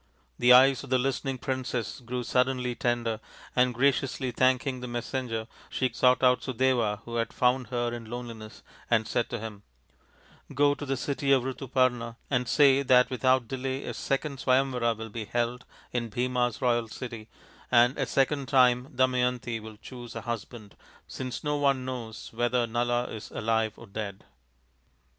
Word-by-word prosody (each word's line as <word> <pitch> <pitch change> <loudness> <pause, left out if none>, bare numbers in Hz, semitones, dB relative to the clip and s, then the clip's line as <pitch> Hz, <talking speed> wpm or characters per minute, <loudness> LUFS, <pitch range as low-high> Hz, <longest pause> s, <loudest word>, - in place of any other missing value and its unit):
The 125 - +5
eyes 130 +2 +7
of 135 - -10
the 130 - +3
listening 135 +1 -1
princess 130 -2 -3
grew 125 0 -4
suddenly 125 0 +1
tender, 120 -2 -1 0.4
and 125 0 +4
graciously 130 +1 +1
thanking 130 +1 +1
the 125 - -6
messenger 120 -1 -3 0.2
she 130 -1 0
sought 125 0 +3
out 125 -1 +5
Sudeva 120 -5 +1
who 120 0 -4
had 115 - -1
found 125 -1 +1
her 120 0 -1
in 115 -2 -7
her - - -12
loneli 120 -1 -6
ness 110 0 -12 0.3
and 110 -2 +2
said 120 - 0
to 120 - -3
him: 105 -2 -7 0.5
" - - -20
Go 145 +1 +4
to 145 0 -7
the 135 0 -1
city 140 +1 -1
of 135 -2 +5
Rituparna 130 -3 0 0.2
and 125 -2 +1
say 140 +1 +5
that 125 -2 +4
with 130 - -5
out 130 -2 +4
delay 130 +2 -3
a - - -4
second 140 0 -2
Swayamvara 130 -3 +2
will 110 0 -7
be 110 0 -5
held 120 +3 -2 0.3
in 120 -2 -2
Bhima's 125 +1 -1
royal 120 -2 +2
city, 115 -1 -8 0.4
and 120 +2 +5
a 135 - 0
second 135 0 +1
time 125 -1 +4
Damayanti 125 -2 +1
will 110 -1 -10
choose 120 +1 -10
a 115 - -4
husband, 115 -1 -6 0.3
since 130 -1 -6
no 150 0 0
one 140 -3 +1
knows 120 -4 -6
whether 120 +1 +1
Nala 120 +1 0
is 110 -3 -7
alive 110 -1 0
or 115 - -11
dead." 100 -2 -6
125 Hz, 170 wpm, -28 LUFS, 115-130 Hz, 0.5 s, eyes